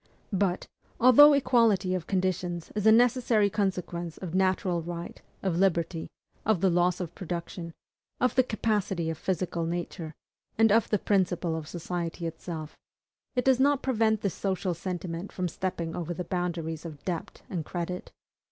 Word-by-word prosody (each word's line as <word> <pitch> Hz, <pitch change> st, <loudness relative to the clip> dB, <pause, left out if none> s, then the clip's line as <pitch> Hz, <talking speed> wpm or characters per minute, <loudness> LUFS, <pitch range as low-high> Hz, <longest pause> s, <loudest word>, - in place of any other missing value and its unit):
But, 190 Hz, -2 st, +1 dB, 0.3 s
although 270 Hz, +5 st, +9 dB
equality 230 Hz, -9 st, +3 dB
of 180 Hz, -3 st, -3 dB
conditions 180 Hz, -2 st, -1 dB
is 210 Hz, 0 st, 0 dB
a -, -, +9 dB
necessary 235 Hz, -3 st, +4 dB
consequence 180 Hz, -5 st, -2 dB
of 175 Hz, -3 st, -6 dB
natural 185 Hz, -2 st, +1 dB
right, 170 Hz, +1 st, -6 dB, 0.2 s
of 185 Hz, -4 st, 0 dB
liberty, 170 Hz, -3 st, +1 dB, 0.3 s
of 220 Hz, -4 st, +2 dB
the 190 Hz, 0 st, +3 dB
laws 175 Hz, 0 st, +2 dB
of 175 Hz, -2 st, -5 dB
production, 170 Hz, -1 st, -5 dB, 0.5 s
of 250 Hz, -, +2 dB
the 260 Hz, -, +5 dB
capacity 205 Hz, -8 st, -1 dB
of 160 Hz, -, -7 dB
physical 180 Hz, -2 st, -1 dB
nature, 170 Hz, -2 st, -4 dB, 0.4 s
and 225 Hz, -1 st, +5 dB
of 225 Hz, +1 st, +4 dB
the 210 Hz, -, +3 dB
principle 180 Hz, -4 st, +1 dB
of 160 Hz, -1 st, -5 dB
society 170 Hz, 0 st, -4 dB
itself, 160 Hz, -1 st, -6 dB, 0.6 s
it 250 Hz, -, +1 dB
does 265 Hz, -1 st, +4 dB
not 285 Hz, +1 st, +3 dB
prevent 220 Hz, -4 st, +2 dB
the 200 Hz, -, 0 dB
social 190 Hz, +1 st, -1 dB
sentiment 175 Hz, +1 st, -5 dB
from 180 Hz, -1 st, -2 dB
stepping 170 Hz, -1 st, -3 dB
over 175 Hz, 0 st, -3 dB
the 180 Hz, -, -3 dB
boundaries 170 Hz, -3 st, -3 dB
of 150 Hz, -4 st, -9 dB
DEBT 175 Hz, -3 st, -4 dB
and 175 Hz, -4 st, -3 dB
CREDIT. 175 Hz, +2 st, -5 dB
180 Hz, 155 wpm, -28 LUFS, 170-205 Hz, 0.6 s, although